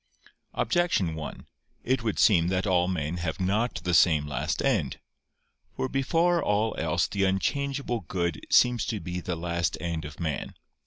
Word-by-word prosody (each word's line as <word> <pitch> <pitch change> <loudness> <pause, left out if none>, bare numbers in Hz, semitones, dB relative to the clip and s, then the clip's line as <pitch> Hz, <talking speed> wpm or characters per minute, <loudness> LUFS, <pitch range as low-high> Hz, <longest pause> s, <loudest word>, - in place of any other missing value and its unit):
Objection 175 - +1
1: 80 -1 -7 0.4
It 130 0 +1
would 110 -3 -2
seem 85 -6 +4
that 95 +2 0
all 90 -3 +2
men 85 -2 -2
have 85 -1 -3
not 105 +6 0
the 90 0 -1
same 80 -4 +5
last 75 +3 -2
end. 105 - 0 0.8
For 130 - -1
before 165 +6 +2
all 105 +1 +1
else 80 +1 +1
the 100 -1 -1
unchangeable 135 +6 0
good 85 -1 -2
seems 125 -3 +4
to 110 - -2
be 90 +1 -4
the 90 0 -3
last 85 -2 -1
end 85 -1 -3
of 75 0 -9
man. 80 -4 -3
90 Hz, 160 wpm, -27 LUFS, 80-115 Hz, 0.8 s, same